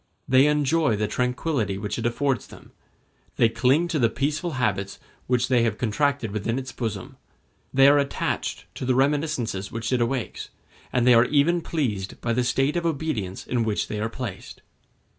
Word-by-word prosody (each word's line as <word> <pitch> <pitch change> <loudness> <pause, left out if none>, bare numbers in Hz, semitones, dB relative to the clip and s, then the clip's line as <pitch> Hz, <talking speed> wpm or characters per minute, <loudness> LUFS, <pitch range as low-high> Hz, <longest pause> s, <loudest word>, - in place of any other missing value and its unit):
They 130 +2 +5
enjoy 150 -3 +2
the 105 0 -1
tranquillity 125 -4 -1
which 105 +3 -4
it 115 - 0
affords 130 +1 -1
them; - - -15 0.6
they 115 - +4
cling 130 +9 +2
to 160 -3 0
the 115 -3 +3
peaceful 150 +8 -2
habits 100 -6 -1 0.3
which 125 -1 +1
they 125 -2 +3
have 115 -2 0
contracted 125 0 0
within 110 +3 -2
its 130 -1 -5
bosom; 115 -3 -5 0.5
they 135 +1 +6
are 145 +1 +6
attached 140 0 -2
to - - -5
the 130 - +2
reminiscences 135 -8 0
which 115 +3 -3
it 125 - +2
awakens, 120 0 -2 0.4
and 125 -2 +1
they 125 - +7
are 115 +1 +6
even 155 +5 +2
pleased 110 - -3
by 115 - -1
the 125 +2 +1
state 135 +5 +1
of 175 - 0
obedience 140 - -2
in 120 -2 0
which 110 -2 -1
they 105 - -3
are 110 +1 -1
placed. 115 -6 -7
125 Hz, 180 wpm, -24 LUFS, 115-140 Hz, 0.6 s, they